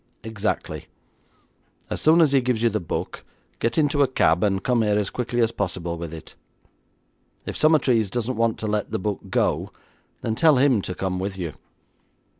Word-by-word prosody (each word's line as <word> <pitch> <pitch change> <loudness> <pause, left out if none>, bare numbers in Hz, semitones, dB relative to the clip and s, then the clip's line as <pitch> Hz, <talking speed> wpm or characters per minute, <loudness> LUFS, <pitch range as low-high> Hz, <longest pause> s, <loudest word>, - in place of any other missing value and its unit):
Exactly. 110 -1 -3 1.0
As - - -2
soon 160 +2 +5
as 155 -4 +4
he 135 -1 +4
gives 120 -2 -1
you 115 - +4
the 110 - 0
book, 85 - -5 0.4
get 115 +1 -1
into 145 -2 +2
a 140 - +5
cab, 85 -9 +2
and 95 -2 +1
come 125 -2 +2
here 105 -1 +2
as 105 -2 -1
quickly 120 -1 -1
as 115 0 +2
possible 90 -5 -3
with 85 -1 -6
it. 80 -1 -10 1.1
If - - -5
Summertrees 130 -9 +3
doesn't 120 +3 -2
want 115 0 +1
to 110 - -2
let 105 -1 -1
the - - -2
book 100 +1 -2
go, - - 0 0.5
then 110 - -1
tell 155 +5 +4
him 130 -4 +3
to 90 - -5
come 95 -1 -2
with 95 +1 -4
you. 85 -5 -4
110 Hz, 185 wpm, -23 LUFS, 95-125 Hz, 1.1 s, soon